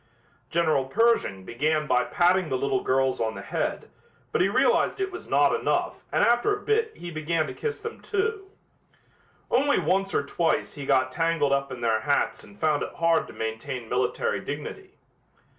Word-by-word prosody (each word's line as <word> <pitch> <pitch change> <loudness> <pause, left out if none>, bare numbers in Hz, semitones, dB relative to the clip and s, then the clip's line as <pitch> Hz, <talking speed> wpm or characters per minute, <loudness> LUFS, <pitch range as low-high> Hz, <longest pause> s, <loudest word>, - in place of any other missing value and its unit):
General 155 -5 +2
Pershing 135 - +1
began 150 +7 0
by 125 -4 +2
patting 180 +2 +2
the 130 - 0
little 130 0 0
girls 130 -1 +1
on 110 -1 -1
the 100 - -7
head, - - -3 0.4
but - - +1
he 185 - +3
realized 200 - +2
it 390 0 -1
was 360 - -8
not - - +3
enough - - -1
and - - +3
after 240 - +3
a - - -12
bit 440 +1 0
he 175 0 -7
began 155 0 -1
to - - -6
kiss 450 -1 -4
them, 450 0 -7
too; 410 -1 -2 1.0
only 285 +3 +3
once 195 0 0
or 140 - +1
twice 165 +3 0
he 140 -2 -7
got 130 -1 +3
tangled 165 -2 +1
up 140 0 -1
in 125 -2 -7
their 115 -2 +2
hats 140 +6 0
and 200 - -16
found 155 -2 +2
it - - -5
hard 165 -1 +2
to - - -11
maintain 115 +2 -4
military 125 -4 0
dignity. 260 - -7
155 Hz, 180 wpm, -26 LUFS, 130-205 Hz, 1.0 s, he